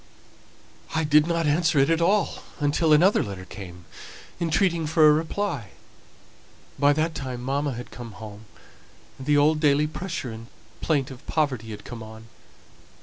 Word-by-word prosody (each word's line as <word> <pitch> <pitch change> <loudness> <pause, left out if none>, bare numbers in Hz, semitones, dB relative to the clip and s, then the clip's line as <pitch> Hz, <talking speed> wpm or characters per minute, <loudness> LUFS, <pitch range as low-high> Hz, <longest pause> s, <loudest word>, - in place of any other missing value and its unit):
"I 160 - +1
did 150 +1 +4
not 170 -1 0
answer 160 +1 +2
it 140 +3 +4
at 165 0 +2
all 200 +4 +1 0.2
until 150 +2 +1
another 175 +7 +5
letter 95 -2 -6
came, 90 -3 -10 0.5
entreating 170 0 +1
for 155 0 +5
a 150 - +7
reply. 160 - -2 1.1
By 145 +1 +5
that 160 +2 0
time 130 -4 -5
mamma 140 +2 -1
had 120 +1 -8
come 120 -3 -9
home, 110 0 -10 0.7
and 135 - -9
the 145 -1 +4
old 150 +2 +4
daily 150 -1 +3
pressure 155 -4 -5
and 115 +1 -9 0.3
plaint 140 -5 0
of 130 0 -11
poverty 130 -8 -1
had 105 -1 -8
come 120 -2 -8
on. 110 +1 -11
145 Hz, 155 wpm, -25 LUFS, 120-160 Hz, 1.1 s, a